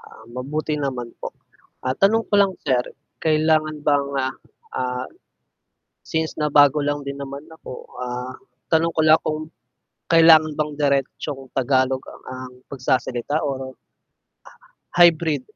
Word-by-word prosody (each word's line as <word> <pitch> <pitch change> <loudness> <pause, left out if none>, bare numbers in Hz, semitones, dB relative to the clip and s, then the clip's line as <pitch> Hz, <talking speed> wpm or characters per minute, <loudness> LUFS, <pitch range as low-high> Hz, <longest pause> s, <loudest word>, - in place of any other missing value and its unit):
Ah, 110 - -15
mabuti 150 +4 -3
naman 130 -4 -3
po. - - -3 0.6
Ah, 130 +1 0
tanong 225 +3 +4
ko - - -7
lang 195 -1 +2
sir 125 -3 +2 0.4
kailangan 155 0 +2
bang, 145 -1 +3 0.2
ah, 130 - -4 0.4
ah, 125 0 -2 1.1
since 160 -1 -1
na 150 - +1
bago 145 +1 +7
lang 145 0 -1
din 140 0 -5
naman 140 0 -6
ako, 160 -5 -10 0.3
ah, 125 +1 -4 0.4
tanong 165 0 +2
ko - - +1
lang 155 0 +6
kung 155 0 -1 0.7
kailangan 160 -1 +7
bang 150 0 0
diretsong 140 0 0
Tagalog 130 0 +1
a - - -12
ang 130 0 -8
pagsasalita 130 +1 -1
or 130 -1 -4 1.2
hybrid? 165 -4 +5
145 Hz, 130 wpm, -22 LUFS, 130-155 Hz, 1.2 s, bago